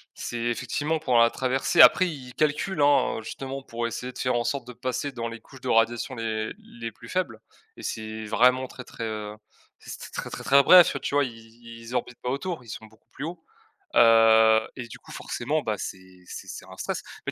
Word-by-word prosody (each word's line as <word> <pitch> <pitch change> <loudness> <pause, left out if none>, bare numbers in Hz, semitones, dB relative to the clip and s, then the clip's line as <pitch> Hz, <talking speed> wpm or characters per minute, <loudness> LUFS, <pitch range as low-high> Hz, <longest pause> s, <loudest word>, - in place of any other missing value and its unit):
c'est 120 - -5
effectivement 130 +6 -1
pour 130 -6 +1
la 115 0 +6
traversée 130 +7 -1
après 185 - +8
ils 130 -6 -9
calculent, 155 +4 0
hein, 145 -5 +3
justement 135 +4 -6
pour 120 -2 -4
essayer 125 +2 -5
de 125 - -13
faire 125 -1 0
en 120 - +1
sorte 130 +2 -2
de 125 - -8
passer 130 +3 -3
dans 115 -3 -4
les 115 0 -7
couches 130 +3 -16
de - - -4
radiation 115 +3 +2
les 110 -2 -3
les 115 -1 -8
plus 115 +2 -14
faibles 170 -12 -2 0.4
et - - -11
c'est 110 0 -5
vraiment 125 +4 +3
très, 125 - -10
très, 115 - -8
heu, 105 -1 -4 0.4
c'était - - -9
très, - - -5
très, - - -7
très 140 +1 +5
bref, 180 +1 +8
heu, - - -2
tu 135 - -4
vois, 145 - +4
ils 120 -4 -5 0.4
ils 115 +2 -7
orbitent 125 -1 -3
pas 125 - -3
autour, 140 +3 -3
ils 115 - -15
sont 110 - -7
beaucoup 110 0 -25
plus 140 - -6
haut, 165 0 -7 0.5
heu 110 -1 +6
et 125 -3 -7
du - - -10
coup, - - -15
forcément, 145 +6 -2
bah, 110 -3 -1
c'est 95 -1 -8
c'est - - -8
c'est - - -8
un - - -12
stress, - - -3 0.2
mais - - -2
125 Hz, 220 wpm, -26 LUFS, 115-135 Hz, 0.5 s, après